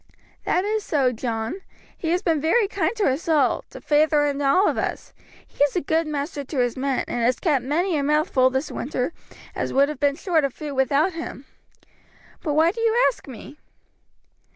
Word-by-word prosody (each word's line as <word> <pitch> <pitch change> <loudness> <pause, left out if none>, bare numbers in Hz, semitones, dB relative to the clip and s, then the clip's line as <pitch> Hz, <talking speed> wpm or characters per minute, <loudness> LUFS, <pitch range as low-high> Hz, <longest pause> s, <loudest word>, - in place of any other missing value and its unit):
"That 365 - +1
is 430 0 -1
so, 275 -8 +1
John; 230 - -4 0.3
he 325 - -4
has 355 +2 +1
been 320 -4 +1
very 395 +8 +3
kind 430 - -1
to 435 - -1
us 280 +1 0
all, 290 -5 +2
to - - -10
feyther 300 0 +3
and 285 0 -1
all 365 +9 +4
of - - +1
us. - - -4 0.3
He - - -1
is 285 - -5
a 360 - +1
good 320 +2 0
master 290 0 -3
to 280 +2 -7
his 245 -2 +1
men, 265 0 -1
and 240 - -2
has 245 +2 +2
kept 290 -8 +1
many 330 +7 0
a 290 - +1
mouth 300 +2 +1
full 255 -1 +4
this 265 +3 -2
winter 255 +3 -3 0.4
as - - -3
would 280 +2 +4
have 300 -3 -6
been 285 -1 +2
short 330 -1 +1
of 275 -2 -2
food 300 -2 -6
without 280 +7 +2
him; 320 -4 -7 1.0
but 300 - -2
why 320 +2 +4
do 455 +4 -6
you 455 0 +2
ask 485 - -17
me?" 270 +4 -11
295 Hz, 205 wpm, -23 LUFS, 270-330 Hz, 1.0 s, all